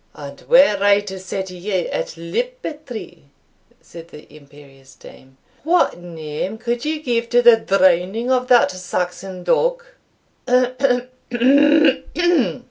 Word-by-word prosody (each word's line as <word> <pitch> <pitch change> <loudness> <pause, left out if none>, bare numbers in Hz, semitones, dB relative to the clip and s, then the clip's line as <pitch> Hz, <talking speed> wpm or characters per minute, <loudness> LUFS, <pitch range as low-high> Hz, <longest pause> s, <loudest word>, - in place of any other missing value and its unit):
"And 140 -1 -10
were 255 -5 +5
I 200 0 +4
to 190 -2 -8
set 190 0 -6
you 180 +3 -7 0.2
at - - -5
liberty," 280 - -6 0.6
said 165 -1 -13
the 150 -2 -15
imperious 140 -2 -18
dame, 130 0 -17 0.3
"what 340 - +1
name 165 +3 -6
could 235 +2 -3
you 310 0 -2
give 235 -3 -1
to 245 0 +3
the 235 -1 +7
drowning 195 +4 +1
of 255 -1 +1
that 240 -7 +4
Saxon 180 0 -5
dog?" - - 0
190 Hz, 115 wpm, -19 LUFS, 170-245 Hz, 0.6 s, the